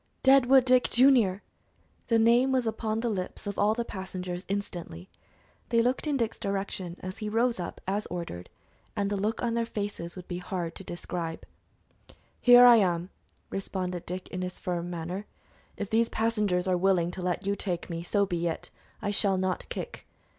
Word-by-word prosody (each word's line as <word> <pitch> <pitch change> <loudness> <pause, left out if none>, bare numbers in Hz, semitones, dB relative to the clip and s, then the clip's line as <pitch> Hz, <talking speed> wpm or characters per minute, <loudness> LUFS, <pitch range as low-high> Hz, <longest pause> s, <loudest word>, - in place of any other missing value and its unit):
"Deadwood 265 -1 +6
Dick, 255 -1 +4
Junior!" 240 -7 +4 0.6
The 230 - +3
name 235 +4 +4
was 255 -2 +2
upon 220 0 -1
the 240 - -1
lips 190 -5 -4
of 200 -1 -4
all 210 +2 +3
the 235 0 -2
passengers, 185 -2 -5
instantly. 175 - -5 0.6
They 230 -1 +3
looked 255 +5 0
in 290 -2 +1
Dick's 230 -3 -2
direction, 195 -3 -3
as 185 0 -6
he 215 - -3
rose 230 0 +1
up 175 - -5
as 200 +2 -1
ordered, 170 - -6 0.5
and 200 0 -1
the - - +1
look 210 +4 -1
on 235 -1 0
their 230 0 0
faces 200 -6 -5
would 180 -1 -9
be 175 -1 -4
hard 180 -2 -4
to 195 - -10
describe. 170 -2 -5 0.9
"Here 245 0 +8
I 240 -1 +9
am!" 180 -3 +1 0.4
responded 185 -2 -3
Dick, 185 +1 -4
in 180 - -4
his 180 0 -4
firm 175 -1 -3
manner. 175 +4 -5 0.5
"If 200 - -5
these 230 +1 +3
passengers 210 -5 0
are 185 - +3
willing 175 -2 +2
to 185 - -7
let 180 +2 -2
you 200 0 +1
take 180 -4 -3
me, 170 -1 -4
so 200 +3 +1
be 175 -3 -1
it; 165 - -3 0.3
I 205 - 0
shall 200 -2 +2
not 185 0 -2
kick. - - -6
195 Hz, 185 wpm, -28 LUFS, 180-225 Hz, 0.9 s, I